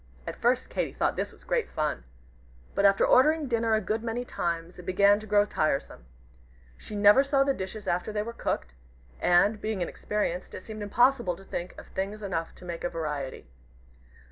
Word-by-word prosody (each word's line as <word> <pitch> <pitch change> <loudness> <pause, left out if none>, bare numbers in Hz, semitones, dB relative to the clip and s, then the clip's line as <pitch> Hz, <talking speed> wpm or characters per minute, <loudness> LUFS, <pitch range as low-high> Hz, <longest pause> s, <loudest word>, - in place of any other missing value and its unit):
At - - -5
first 250 +2 +1
Katy - - -2
thought - - 0
this - - -2
great - - 0
fun. 150 - -2 0.7
But 200 - +2
after 195 0 +5
ordering 305 +3 +4
dinner 230 -2 +2
a 215 - +1
good 215 +3 -1
many 235 +2 -3
times, 170 -3 -3
it - - -9
began 200 +3 +4
to 215 - -10
grow 205 0 +4
tiresome. 140 - -1 0.7
She 210 - -9
never 205 +6 +6
saw 275 -1 +3
the 275 0 +1
dishes 195 -1 -6
after 180 +4 0
they 210 0 -1
were 235 +2 -6
cooked; 65 - -3 0.5
and, 205 +5 +3
being 215 -2 -2
inexperienced, 185 -1 -3
it 185 - -8
seemed 215 0 -8
impossible 235 -2 +2
to 195 - -14
think 180 -2 -6
of - - -11
things 200 +3 -4
enough 170 -4 -3
to - - -13
make 170 -1 -6
a 175 - 0
variety. 150 -5 -4
205 Hz, 185 wpm, -28 LUFS, 175-230 Hz, 0.7 s, never